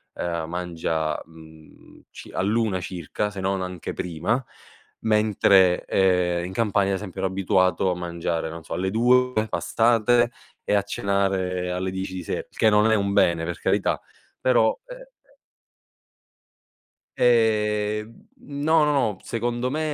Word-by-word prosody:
ehm, 85 -2 -3
mangia, 80 -3 -2
mhmm, 80 -1 -17
ci - - -11
all'1 105 -1 0
circa, 90 +4 -4
se 100 - -8
non 95 0 -1
anche 90 -2 -5
prima, 90 +9 -2 0.6
mentre, 100 -4 +3
ehm, 90 -2 +2
in 90 - -6
Campania, 100 -2 +1
ad 95 - 0
esempio, 95 -3 -7
ero 95 - 0
abituato 95 -1 +1
a - - -1
mangiare, 85 -2 -3
non 80 0 -8
so, - - -7
alle 95 +1 -1
2 125 -1 +3
passate 120 +2 +2 0.3
e - - 0
a 100 - +4
cenare 95 -3 -1
alle 95 +1 -2
10 95 0 -5
di 90 - -5
se - - -4
che 110 - +3
non 105 +1 +4
è - - +4
un 100 -1 0
bene, 85 -3 +3
per 85 -1 -4
carità, - - 0 0.4
però, 120 -3 +3
eh - - -8
eh - - -20 1.8
ehm, 105 -2 +2 0.3
no, 150 +2 +1
no, 150 - +2
no, 110 -9 +1
secondo 120 +2 -2
me 155 - -2
100 Hz, 145 wpm, -24 LUFS, 90-110 Hz, 1.8 s, a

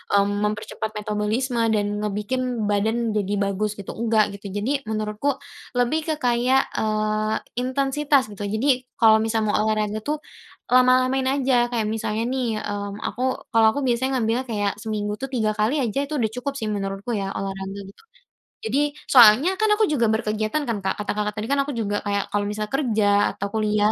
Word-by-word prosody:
mmm, 200 0 +3 0.2
mempercepat 215 +1 -5
metabolisme, 210 +4 -1 0.2
dan 205 0 -1
ngebikin 215 +3 -2
badan 220 +3 +1
jadi 205 -1 -1
bagus 200 +1 -1
gitu, 200 -2 -7
enggak 220 -3 +2
gitu. 200 - -8
Jadi, 210 +9 -1
menurutku 215 +5 -1 0.4
lebih 245 +6 +2
ke 315 - +1
kayak, 245 +2 +2
eee, 215 0 0 0.2
intensitas, 270 -1 +1
gitu. 205 0 -5
Jadi, 250 +4 +1
kalau 220 -2 +6
misal 225 0 0
mau 210 - +1
olahraga 215 0 0
tuh 300 +7 -3 0.5
lama-lamain 255 +1 +4
aja, 260 -3 +2
kayak 230 -3 0
misalnya 220 0 -2
nih, 260 -1 -1 0.2
mmm, 205 0 -5
aku 245 - -4 0.3
kalau 225 -1 +5
aku 285 - -1
biasanya 260 +2 +1
ngambilnya 230 +3 0
kayak 205 -3 0
seminggu 210 -1 -3
tuh 270 - -3
3 225 -5 0
kali 255 +6 +2
aja, 235 +3 -1
itu 305 - -4
udah 225 -6 0
cukup 250 +4 -4
sih, 225 -6 -3
menurutku 195 +2 -3
ya, 200 -4 -1
olahraga 195 0 -4
gitu. - - -24 0.6
Jadi 285 +6 0 0.2
soalnya 250 - +7
kan 435 - +3
aku 435 - +4
juga 285 - +1
berkegiatan 220 +5 -1
kan 230 -4 -1
Kak, 190 0 -1
kata 210 - -2
Kakak 210 0 -2
tadi 210 - -2
kan 280 - +2
aku 275 - -4
juga 205 -2 -1
kayak 200 0 -2
kalau 205 0 +1
misalnya 210 0 -4
kerja, 235 -7 +1 0.3
atau 200 - -3
kuliah, 210 -1 +2
220 Hz, 175 wpm, -23 LUFS, 210-255 Hz, 0.6 s, soalnya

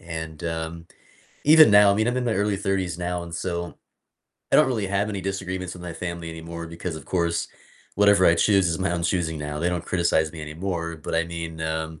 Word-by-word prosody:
and, 80 -3 -7
um, 80 0 -4 0.6
even 155 -4 +8
now, 100 0 +7
I - - +1
mean, 110 +3 +1
I'm 125 - 0
in 125 - 0
my 115 - +1
early 100 0 +1
30s 95 -3 -1
now, 90 0 -2
and 85 -1 -8
so, 85 0 -4 0.8
I - - +7
don't - - +6
really 110 -6 -1
have 100 +2 0
any 100 -2 -3
disagreements 95 -1 -4
with 90 - -11
my 90 -1 -5
family 85 -1 -5
anymore 85 +1 -7
because 85 0 -5
of 75 - -10
course, 85 -2 0 0.5
whatever 100 -2 +5
I 85 - +6
choose 95 -1 +3
is 80 - -1
my 95 -1 0
own 85 -1 -2
choosing 85 -3 -1
now, 75 0 -4
they 85 +2 +1
don't 90 -2 -2
criticize 85 -3 +1
me 80 - -8
anymore, 85 +1 -4
but 80 - -5
I 85 0 +2
mean, 85 -1 -6
um, 80 0 -3
85 Hz, 220 wpm, -24 LUFS, 80-95 Hz, 0.8 s, even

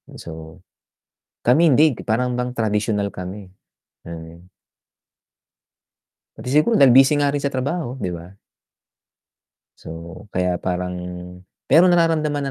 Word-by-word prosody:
And - - -12
so, 80 +2 -10 0.8
kami 150 +7 +4
hindi 150 -1 +4
parang 125 +3 0
bang 125 0 -3
tradisyonal 105 -3 -1
kami. 95 +1 -8 0.6
Hmm. 85 +1 -10 1.9
Pati - - -10
siguro 150 - +3
dahil 130 -3 +6
busy 135 +2 +6
nga 145 - +2
rin 140 0 -1
sa 140 - -1
trabaho, 135 0 -3
'di 90 - -3
ba? 85 +2 -11 1.5
So, 85 +4 -10
kaya 90 -1 0
parang 90 0 -3 0.8
pero 165 +6 +7
nararamdaman 160 -4 +2
120 Hz, 115 wpm, -21 LUFS, 90-145 Hz, 1.9 s, pero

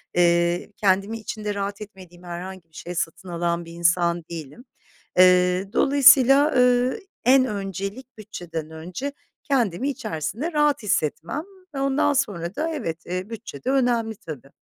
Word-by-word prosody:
eee, 175 +2 +2
kendimi 200 +3 +1
içinde 215 -1 -4
rahat 200 +1 -4
etmediğim 185 -4 -12
herhangi 175 0 -8
bir 160 - -25
şey 175 +2 -7
satın 175 +2 -3
alan 170 0 -1
bir 165 - -11
insan 170 0 +1
değilim. 165 - -8 0.5
Eee, 180 +1 +5
dolayısıyla, 280 +1 +6
eee, 250 - +3 0.3
en 260 +1 +6
öncelik 200 +3 -5
bütçeden 175 -7 -7
önce 180 - -6 0.3
kendimi 250 -2 0
içerisinde 220 - -4
rahat 295 -5 +2
hissetmem 170 - -1 0.3
ve - - -2
ondan 275 +2 +2
sonra 200 -10 -2
da, 315 +3 -1
evet, 180 - -4
eee, 185 +3 -4
bütçe 225 0 -8
de 255 - -1
önemli, 240 -4 +1
tabii. 150 -8 -9
195 Hz, 140 wpm, -23 LUFS, 170-255 Hz, 0.5 s, dolayısıyla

